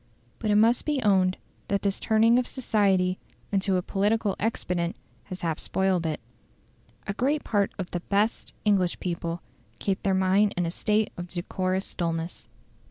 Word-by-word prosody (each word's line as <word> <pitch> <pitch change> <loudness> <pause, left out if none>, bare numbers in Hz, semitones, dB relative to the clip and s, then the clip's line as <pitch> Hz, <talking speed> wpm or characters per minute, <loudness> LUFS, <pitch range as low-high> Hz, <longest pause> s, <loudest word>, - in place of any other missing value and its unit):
But 215 - -2
it 205 - +4
must 225 +3 +4
be 295 -2 +1
owned 190 -3 +3 0.3
that 200 -1 0
this 200 -1 0
turning 225 +2 +4
of 250 - 0
society 195 -7 +1 0.3
into 195 -1 +2
a 180 - -1
political 205 +1 +1
expedient 180 -5 -1 0.3
has 185 -2 -7
half 165 -2 -1
spoiled 190 -3 +1
it. 155 -1 -2 0.9
A 200 - -2
great 275 +7 0
part 200 -2 +1
of 185 -3 -5
the 175 - -1
"best" 205 +5 -1
English 190 -4 +2
people 170 -1 -3 0.3
keep 195 -1 -1
their 195 -1 +1
mind 190 +2 +3
in 175 - +1
a 165 - -2
state 210 +4 +1
of 175 0 -5
decorous 185 +2 -2
dulness. 165 -1 -3
195 Hz, 165 wpm, -27 LUFS, 180-210 Hz, 0.9 s, it